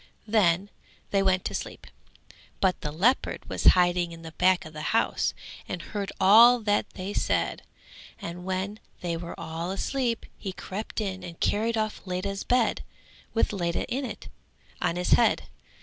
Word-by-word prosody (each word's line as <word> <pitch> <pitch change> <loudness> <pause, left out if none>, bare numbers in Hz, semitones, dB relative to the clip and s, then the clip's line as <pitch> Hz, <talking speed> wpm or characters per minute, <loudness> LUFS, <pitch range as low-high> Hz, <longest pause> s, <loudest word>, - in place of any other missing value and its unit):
Then 200 -3 +3 0.4
they 195 - +3
went 190 -1 +2
to - - -2
sleep; - - -5 0.7
but 190 -2 +1
the 150 - -3
leopard 215 - +1
was - - -4
hiding 175 -1 +2
at 165 - -13
the 160 - -8
back 185 +2 +2
of 155 - -10
the 155 - -6 0.2
house - - +1 0.3
and 180 - -3
heard 200 +4 -4
all 235 +5 +8
that 205 -1 +1
they 190 +2 -4
said; - - 0 0.6
and 175 +1 -6
when 190 +3 -3 0.2
they 170 -2 -2
were 170 +1 -7
all 165 +2 -4
asleep, 235 +4 -1
he 190 -3 -5
crept 210 +4 -5
in 190 -3 -3
and 170 -1 -9
carried 225 +2 +1
off 215 -1 -2
Ledha's 195 +2 -3
bed 245 -2 +2 0.5
with 225 - +2
Ledha 175 -3 -1
in 270 +3 -1
it 225 -5 -6 0.5
on 170 - +1
his 180 0 -1
head. 235 - +4
190 Hz, 165 wpm, -27 LUFS, 175-215 Hz, 0.7 s, all